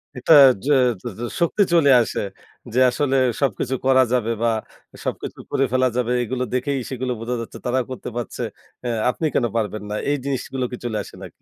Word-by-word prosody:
এটা 125 +6 +3 0.3
য - - -4 0.4
য - - -19
য - - -6 0.2
শক্তি 170 +5 +3
চলে 160 -4 +5
আসে। 115 - -2 0.5
যে 125 - +2
আসলে 135 +1 0 0.3
সবকিছু 130 0 0
করা 130 -1 +5
যাবে 115 -2 +1
বা 115 - +3 0.6
সবকিছু - - -4
করে 135 - +2
ফেলা 130 0 +3
যাবে, 125 -1 0
এগুলো 125 +2 -2
দেখেই 135 +2 0
সেগুলো 130 -1 -3
বোঝা 120 +2 -3
যাচ্ছে, 115 - -8
তারা 125 +1 +1
করতে 130 - -6
পারছে, 120 - -5 0.4
অ্যা 120 - -1 0.2
আপনি 160 - -2
কেন 125 - +3
পারবেন 110 -2 -2
না? 105 - -3
এই 145 - +2
জিনিসগুলো 135 -1 -2
কি 125 - -5
চলে 110 -3 -2
আসে - - -13
নাকি? - - -12
125 Hz, 190 wpm, -22 LUFS, 120-135 Hz, 0.6 s, চলে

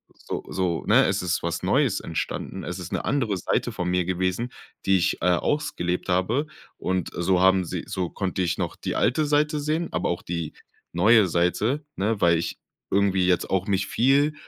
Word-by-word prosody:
so - - -6
so, 90 -3 -1
ne, - - +6
es 95 +1 0
ist 90 0 -1
was 85 0 -2
Neues 115 +2 +2
entstanden. 80 -2 -4
Es 90 +1 -5
ist 90 -1 -7
'ne - - -2
andere 120 -8 0
Seite 90 - -1
von 90 0 -3
mir 90 -1 +1
gewesen, 95 +6 -1 0.4
die 95 0 +5
ich, 85 - +1
äh, - - -1
ausgelebt 90 -4 -1
habe 105 +12 +1 0.3
und, 95 -2 -2
äh, - - -3
so 90 +1 +2
haben 95 0 +5
sie - - -4
so 90 -2 -2
konnte 95 -2 -2
ich 85 -2 0
noch - - -3
die - - -4
alte 150 +5 +2
Seite 150 +1 +2
sehen, 155 +3 -1
aber - - -1
auch 85 - -2
die 85 -2 -4 0.4
neue 105 +4 +5
Seite, 105 - 0
ne? 105 +2 0
Weil 85 -1 +5
ich 85 - -4 0.3
irgendwie 95 -2 +2
jetzt 90 -2 +1
auch 95 0 0
mich 100 -1 +1
viel 140 +7 +3
95 Hz, 195 wpm, -25 LUFS, 90-120 Hz, 0.4 s, ne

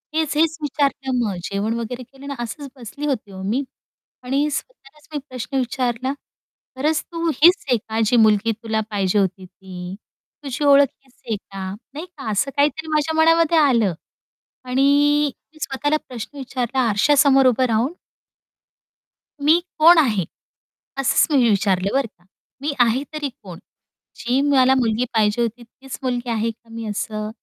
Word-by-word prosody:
हेच, 315 -2 0
हेच 320 0 +2
विचारलं 275 -3 -1
मग 200 -3 -2
जेवण 200 +4 -2
वगैरे 245 +2 -5
केलं 270 +3 -14
ना, 280 - -4
असच 240 +5 -5
बसली 255 +5 -7
होती 250 -8 -2
ओ 190 0 -9
मी. 235 +8 0 0.6
आणि 275 +4 0
स्वतःलाच 300 - -8
मी - - -1
प्रश्न 255 +1 -4
विचारला, 255 0 -1 0.6
"खरंच 305 +3 +1
तू 335 0 -2
हीच 340 +4 +6
आहे 245 - +4
का, 220 +1 -5
जी 245 - +2
मुलगी 215 +1 +3
तुला 220 0 -2
पाहिजे 200 -1 +1
होती 190 -1 -1
ती 185 0 -9 0.5
तुझी 275 +2 -3
ओळख 280 0 +6 0.2
हीच 265 - -27
आहे 225 - 0
का?" 195 -1 -7 0.2
नाही 310 +4 -6
का 300 -10 -8
असं 270 +7 0
काहीतरी 300 +2 +1
माझ्या 310 +1 +1
मनामध्ये 330 0 +4
आलं 235 - +3 0.7
आणि 255 +2 +1 0.7
मी 310 - -18
स्वतःला 290 +3 0
प्रश्न 250 +3 -8
विचारला 260 -1 -3
आरशा 220 +8 +3
समोर 270 -1 +5
उभं 255 +1 +3
राहून 235 +7 0 1.5
"मी 310 +4 +5 0.2
कोण 335 +3 +8
आहे?" 220 - +2 0.7
असंच 270 -2 +3
मी 245 -4 +4
विचारलं 195 -2 +1
बरं 270 -3 +1
का, 175 -4 -32 0.4
"मी 290 0 -1
आहे 245 +3 +3
तरी 295 -2 -3
कोण? 180 -4 -10 0.6
जी 245 +3 0
मला 265 -2 +5
मुलगी 240 -1 +1
पाहिजे 215 +1 +2
होती, 235 +1 -2
तीच 265 +3 -10
मुलगी 245 -1 -2
आहे 225 0 0
का 230 +1 -24
मी?" 230 0 -7
असं. 215 +1 -3
255 Hz, 160 wpm, -21 LUFS, 220-285 Hz, 1.5 s, कोण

